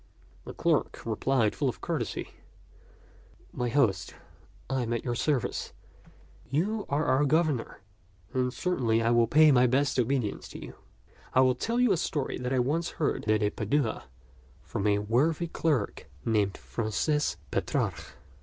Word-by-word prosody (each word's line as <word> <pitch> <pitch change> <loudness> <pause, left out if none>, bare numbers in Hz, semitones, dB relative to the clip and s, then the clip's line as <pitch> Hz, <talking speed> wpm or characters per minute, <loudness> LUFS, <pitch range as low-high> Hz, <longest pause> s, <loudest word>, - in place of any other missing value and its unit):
The - - -8
clerk - - 0
replied 115 0 +1
with - - -14
full 135 -4 +1
courtesy, 155 -9 -4 1.2
"My 125 -1 -1
host, 115 -6 +1 0.5
I 135 -1 -1
am 120 -1 -2
at 115 - -2
your 120 - 0
service. 130 +1 -1 0.8
You 200 +9 -1
are 145 +2 +1
our 130 +3 +3
governor, 150 -7 0 0.5
and 125 -1 +1
cer 180 +7 -1
tainly 115 -2 +1
I 115 - +3
would 120 -1 +3
pay 155 +2 +7
my 125 -1 +5
best 135 +2 +1
obedience 125 -3 -1
to - - -9
you. - - -9 0.6
I 130 - +7
will 130 -1 +4
tell 230 - -1
you 250 -3 +4
a 185 - +3
story 150 -3 -2
that 125 0 -3
I 135 - +2
once 150 +7 0
heard 145 -7 -1
at 105 -1 +2
Padua 115 +2 -1 0.6
from 100 - -2
a 100 -1 +3
worthy 130 +11 +1
clerk 155 -8 -1 0.2
named 105 -3 +1
Francis 135 +7 -1
Petrarch. - - -2
130 Hz, 155 wpm, -28 LUFS, 115-150 Hz, 1.2 s, pay